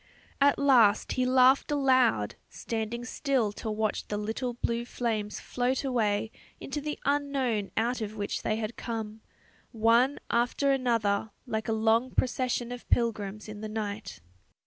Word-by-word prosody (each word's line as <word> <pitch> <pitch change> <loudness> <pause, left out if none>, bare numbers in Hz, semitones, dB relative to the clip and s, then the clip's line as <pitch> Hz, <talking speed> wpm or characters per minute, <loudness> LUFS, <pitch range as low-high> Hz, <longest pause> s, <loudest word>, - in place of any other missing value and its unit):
At 280 0 +5
last 245 -7 +4
he 255 0 +1
laughed 260 +2 +5
aloud, 255 - +3 0.2
standing 230 +1 -4
still 255 -5 0
to 220 - -6
watch 215 0 -1
the 210 - -2
little 225 +4 -3
blue 235 0 -1
flames 220 -4 -3
float 250 +2 -1
away 220 -5 0 0.3
into 290 +2 -4
the 300 +1 -4
unknown 275 -7 0
out 235 +2 0
of 215 0 -4
which 205 -1 -3
they 215 - 0
had 220 +1 -4
come, 220 -2 -5 0.5
one 235 +4 +3
after 245 +4 +2
another 230 -6 +1 0.2
like 220 -3 -3
a - - 0
long 225 +3 +2
procession 250 -1 -1
of 245 0 -8
pilgrims 210 -3 0
in 210 -1 -8
the 215 - -5
night.... 210 - -5
230 Hz, 145 wpm, -28 LUFS, 215-255 Hz, 0.5 s, At